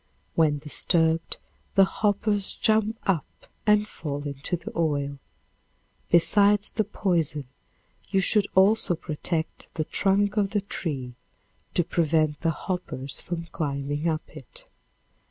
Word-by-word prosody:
When 155 Hz, -3 st, +3 dB
disturbed 160 Hz, +2 st, +2 dB, 0.4 s
the 195 Hz, -1 st, +7 dB
hoppers 205 Hz, 0 st, 0 dB
jump 220 Hz, 0 st, +2 dB
up 180 Hz, -6 st, 0 dB, 0.4 s
and 210 Hz, 0 st, +4 dB
fall 145 Hz, -6 st, -5 dB
into 145 Hz, +4 st, -3 dB
the -, -, -8 dB
oil. 145 Hz, -4 st, -1 dB, 0.9 s
Besides 205 Hz, +4 st, +4 dB
the 215 Hz, -, +1 dB
poison, 170 Hz, -8 st, -1 dB, 0.6 s
you 195 Hz, -, +2 dB
should 200 Hz, +2 st, +3 dB
also 190 Hz, -1 st, +4 dB
protect 160 Hz, +1 st, -3 dB
the 155 Hz, -, 0 dB
trunk 200 Hz, +5 st, +1 dB
of 200 Hz, -2 st, +2 dB
the -, -, +1 dB
tree 140 Hz, -10 st, -4 dB, 0.6 s
to 175 Hz, -, +3 dB
prevent 155 Hz, -3 st, +1 dB
the 165 Hz, -, +1 dB
hoppers 165 Hz, -5 st, -4 dB
from 170 Hz, -1 st, -4 dB
climbing 145 Hz, 0 st, -2 dB
up 155 Hz, -1 st, -2 dB
it. -, -, -12 dB
170 Hz, 120 wpm, -26 LUFS, 150-200 Hz, 0.9 s, the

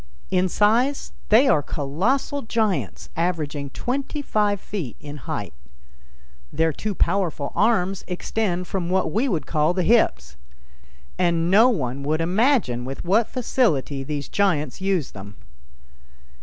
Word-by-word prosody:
In 185 Hz, 0 st, +2 dB
size 235 Hz, +9 st, +2 dB, 0.2 s
they 235 Hz, +6 st, +6 dB
are 150 Hz, -, +4 dB
colossal 185 Hz, -, -1 dB
giants, 220 Hz, -4 st, -1 dB
averaging 155 Hz, -4 st, -2 dB
twenty 275 Hz, -, -3 dB
five 210 Hz, -5 st, +1 dB
feet 180 Hz, -, -5 dB
in 145 Hz, 0 st, -8 dB
height. 125 Hz, -, -5 dB, 1.0 s
Their 160 Hz, +1 st, +1 dB
two 210 Hz, +6 st, -4 dB
powerful 170 Hz, -6 st, 0 dB
arms 195 Hz, -4 st, +1 dB
extend 180 Hz, 0 st, -2 dB
from 180 Hz, -2 st, -3 dB
what 185 Hz, -3 st, +1 dB
we 235 Hz, -, +1 dB
would 160 Hz, -, -1 dB
call 155 Hz, +2 st, +1 dB
the 185 Hz, -, +1 dB
hips, 120 Hz, -, +2 dB, 0.8 s
and 170 Hz, -1 st, +2 dB
no 220 Hz, +6 st, +7 dB
one 140 Hz, -, -2 dB
would 155 Hz, +3 st, 0 dB
imagine 180 Hz, -, +2 dB
with 135 Hz, +6 st, -6 dB
what 210 Hz, +6 st, +3 dB
facility 155 Hz, -, 0 dB
these 145 Hz, 0 st, -4 dB
giants 165 Hz, -7 st, 0 dB
use 190 Hz, -7 st, 0 dB
them. 100 Hz, 0 st, -10 dB
180 Hz, 130 wpm, -23 LUFS, 150-215 Hz, 1.0 s, no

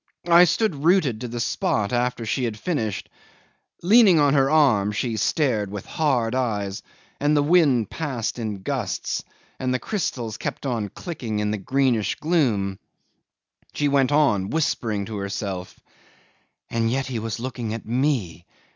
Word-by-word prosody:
I 175 Hz, +1 st, +8 dB
stood 175 Hz, -5 st, 0 dB
rooted 155 Hz, -, +3 dB
to 125 Hz, -, -3 dB
the 120 Hz, 0 st, -5 dB
spot 110 Hz, -2 st, 0 dB
after 120 Hz, -1 st, 0 dB
she 120 Hz, +4 st, -1 dB
had 110 Hz, -2 st, -3 dB
finished. 110 Hz, -, -2 dB, 0.8 s
Leaning 200 Hz, -3 st, +6 dB
on 145 Hz, -2 st, +4 dB
her 135 Hz, -2 st, +3 dB
arm, 130 Hz, -10 st, +3 dB
she 115 Hz, +2 st, -2 dB
stared 110 Hz, -, +1 dB
with 100 Hz, -1 st, -6 dB
hard 125 Hz, -7 st, 0 dB
eyes, 105 Hz, -6 st, -2 dB, 0.4 s
and 150 Hz, +1 st, +2 dB
the 145 Hz, -, +3 dB
wind 145 Hz, -8 st, +3 dB
passed 130 Hz, -7 st, -3 dB
in 105 Hz, -4 st, -4 dB
gusts, -, -, -2 dB, 0.4 s
the 130 Hz, -1 st, 0 dB
crystals 125 Hz, -, -3 dB
kept -, -, -5 dB
on 115 Hz, -6 st, -2 dB
clicking 120 Hz, -, -5 dB
in 105 Hz, 0 st, 0 dB
the 105 Hz, -, -2 dB
greenish 125 Hz, -2 st, +1 dB
gloom. 115 Hz, -, 0 dB, 0.9 s
She 145 Hz, -, 0 dB
went 140 Hz, -1 st, +2 dB
on 105 Hz, -11 st, +2 dB
whispering 115 Hz, -10 st, -1 dB
to 110 Hz, 0 st, -6 dB
herself: 100 Hz, -2 st, -5 dB, 0.9 s
"And 115 Hz, -1 st, 0 dB
yet 135 Hz, +2 st, -1 dB
he 125 Hz, -2 st, -3 dB
was 115 Hz, 0 st, -4 dB
looking 120 Hz, -3 st, -4 dB
at 115 Hz, -, -8 dB
me! 115 Hz, -, -1 dB
120 Hz, 150 wpm, -23 LUFS, 105-145 Hz, 0.9 s, I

